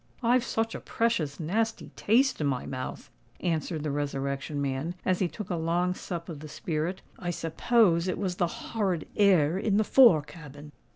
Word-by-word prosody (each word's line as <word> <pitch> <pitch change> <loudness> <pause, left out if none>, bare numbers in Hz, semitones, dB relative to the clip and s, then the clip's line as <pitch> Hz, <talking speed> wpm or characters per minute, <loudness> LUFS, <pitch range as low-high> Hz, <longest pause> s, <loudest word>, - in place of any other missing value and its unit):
"I've 245 +1 +4
such 225 -3 -1
a - - -5
precious 180 -12 -1
nasty 220 +8 -1
taste 250 - +2
in 145 - +1
my 130 -3 -1
mouth," 130 -1 -6 0.3
answered 160 -2 -2
the 150 - -1
Resurrection 140 0 -3
Man, 140 +5 -2
as 185 -1 +2
he 185 - +2
took 205 +2 -7
a - - +1
long 170 +2 0
sup 170 -2 -6
of 160 -4 -7
the 155 +1 -9
spirit. 160 +4 -3 0.2
"I 175 - -4
suppose 170 +2 +2
it 185 - -1
was 185 -3 -2
the 175 - +2
horrid 190 -2 -2
air 185 -4 +4
in 205 -1 +1
the 215 - +4
fore 210 - +6
cabin." 150 -2 -12
170 Hz, 180 wpm, -28 LUFS, 150-200 Hz, 0.3 s, fore